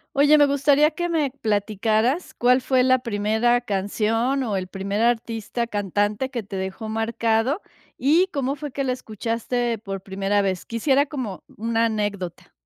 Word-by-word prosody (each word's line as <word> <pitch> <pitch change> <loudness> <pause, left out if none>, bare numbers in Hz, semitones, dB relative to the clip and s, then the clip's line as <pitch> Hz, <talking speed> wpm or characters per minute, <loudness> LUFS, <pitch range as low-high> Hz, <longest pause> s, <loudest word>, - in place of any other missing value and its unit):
Oye, 290 +2 +6
me 290 - +6
gustaría 285 +2 +4
que 345 +2 -3
me 320 -5 +1
platicaras, 220 - 0
¿cuál 250 +1 +3
fue 260 0 +2
la 255 0 +4
primera 230 +1 +1
canción, 225 +5 0
o, 220 -6 -1
el 185 - -3
primer 195 +2 -3
artista, 235 0 -1
cantante, 205 +3 -1
que 245 -3 -3
te 200 -1 -9
dejó 190 +3 -4
marcado, 225 - 0 0.3
y 310 +8 +3
cómo 275 -1 -1
fue 295 0 -6
que 275 - -2
la 260 - 0
escuchaste 235 +1 -2
por 195 -2 -6
primera 195 +1 0
vez? 190 -2 -2
Quisiera 265 +5 +2
como 255 - -5
una 230 +1 +1
anécdota. 205 -5 -3
230 Hz, 155 wpm, -23 LUFS, 205-265 Hz, 0.3 s, Oye